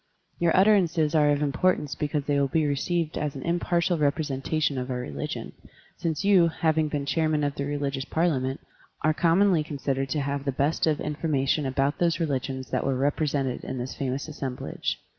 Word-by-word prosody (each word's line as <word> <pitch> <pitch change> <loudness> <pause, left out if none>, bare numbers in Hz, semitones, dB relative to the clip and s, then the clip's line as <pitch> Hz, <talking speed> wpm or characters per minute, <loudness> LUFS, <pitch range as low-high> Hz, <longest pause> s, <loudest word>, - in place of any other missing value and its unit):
Your 170 +1 +3
utterances 180 -6 +4
are 150 -2 +4
of 145 0 +2
importance 150 0 +1
because 150 -1 -2
they 145 0 +1
will 140 - +2
be 155 +3 +1
received 155 +3 -1
as 150 -2 -2
an 135 - -6
impartial 170 0 +1
representation 145 -1 0
of 125 +1 -4
our 125 - -2
religion, 75 -13 -5 0.4
since 165 +2 -2
you, 190 -4 +6
having 160 -1 +1
been 145 -2 -2
Chairman 155 0 +1
of 145 -1 0
the 140 - -3
Religious 140 -2 -2
Parliament, 140 -6 0 0.4
are 155 - +3
commonly 175 +1 +3
considered 135 -2 -2
to 145 +3 0
have 140 0 -2
the 140 - 0
best 145 +5 0
of 155 -2 +1
information 145 -2 0
about 135 +2 0
those 170 -1 +2
reli 145 -6 0
gions 130 -1 -6
that 130 - 0
were 135 -1 0
represented 140 -1 0
at 130 - -5
this 125 +1 -4
famous 135 +1 -3
assemblage. 135 -4 -4
145 Hz, 180 wpm, -26 LUFS, 135-160 Hz, 0.4 s, you